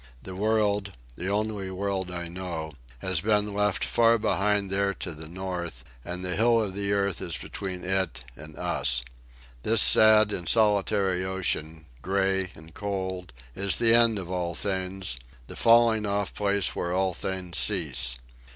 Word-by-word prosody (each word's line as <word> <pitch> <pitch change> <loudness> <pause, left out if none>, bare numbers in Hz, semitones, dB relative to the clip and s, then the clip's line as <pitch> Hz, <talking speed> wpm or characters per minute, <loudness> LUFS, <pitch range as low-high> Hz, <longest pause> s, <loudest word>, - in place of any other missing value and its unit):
The 95 - -8
world—the 100 - -1
only 105 -1 -2
world 95 -1 -2
I 85 -1 -5
know—has 80 -3 -4
been 105 -1 +1
left 105 -1 +1
behind 115 -1 +3
far 105 +1 +2
there 100 +1 0
to 90 - -5
the 80 +1 -8
north, 85 -6 -5 0.2
and 90 +1 -5
the 90 - -2
hill 115 +1 +4
of 105 -4 -1
the 100 0 -2
earth 100 -2 0
is - - -3
between 95 -3 -6
it 90 -9 -1
and 75 +2 -12
us. 60 0 +1 0.6
This - - +2
sad 110 -1 +6
and 90 -3 -3
solitary 100 -4 +2
ocean, 80 -4 -3 0.2
gray 95 +1 0
and 80 +1 -14
cold, 95 -4 -4 0.2
is 100 0 +1
the 115 -1 +3
end 115 -2 +5
of 90 -2 -6
all 90 -2 -2
things, 95 -7 -2 0.3
the - - -10
falling 115 -2 +4
off 100 0 -1
place 100 -2 0
where 85 - -2
all 95 0 +1
things 90 -2 -3
cease. 75 - +1
95 Hz, 150 wpm, -27 LUFS, 85-105 Hz, 0.6 s, sad